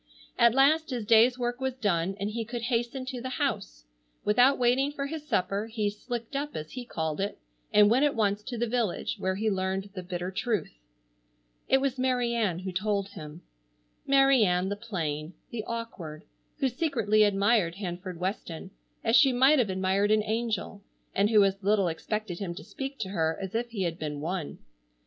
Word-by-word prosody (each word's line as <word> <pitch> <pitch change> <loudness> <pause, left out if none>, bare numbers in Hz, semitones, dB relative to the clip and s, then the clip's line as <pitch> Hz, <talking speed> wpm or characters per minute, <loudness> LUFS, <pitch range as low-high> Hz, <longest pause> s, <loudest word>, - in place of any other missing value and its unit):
At 235 0 +5
last 305 +4 +4
his 245 -5 -3
day's 230 +3 +5
work 245 +1 -2
was 265 -1 -1
done 195 -6 0
and 200 +2 -2
he 230 +1 -2
could 235 +1 -5
hasten 240 +2 -1
to 255 -2 -5
the 255 0 -4
house. - - -2 0.4
Without 245 +6 +5
waiting 255 +3 +2
for 280 -1 -4
his 300 +1 -6
supper, 200 +1 0
he 215 -2 -1
"slicked 235 +4 -6
up," 290 +1 -3
as 155 0 -6
he 250 -1 -6
called 160 -5 -3
it, 200 - -2 0.3
and 210 -1 +6
went 245 +6 +4
at 290 -1 +2
once 205 -2 +1
to 245 -2 -5
the 240 - +1
village, 230 -5 -1
where 190 0 0
he 215 +3 -1
learned 190 0 -1
the 185 - -5
bitter 180 0 -4
truth. 215 +2 -2 0.9
It 265 - +4
was 270 -1 -1
Mary 250 -2 +1
Ann 210 -8 0
who 185 +1 -5
told 200 +1 -1
him. 155 -2 -10 0.6
Mary 270 -3 +5
Ann, 180 -1 +1
the 205 - -1
plain, 170 -7 -4 0.2
the 225 -3 -4
awkward, 195 -10 -6 0.3
who 275 -3 +1
secretly 245 - +1
admired 200 -3 +3
Hanford 180 -2 -6
Weston 185 -1 -4 0.3
as 225 +1 +3
she 270 -1 +7
might 265 +4 +5
have 230 -5 +2
admired 190 +2 +1
an 215 0 +3
angel, 220 -2 -2 0.3
and 200 +2 +2
who 215 -2 +6
as 195 0 0
little 200 -1 +2
expected 175 +3 -3
him 180 -4 -4
to - - -8
speak 270 0 -6
to 190 - -3
her 160 -4 0
as 190 -1 -5
if 235 +1 -1
he 210 -5 -3
had 170 -1 -2
been 150 -2 -4
one. 165 0 -4
210 Hz, 190 wpm, -28 LUFS, 190-245 Hz, 0.9 s, she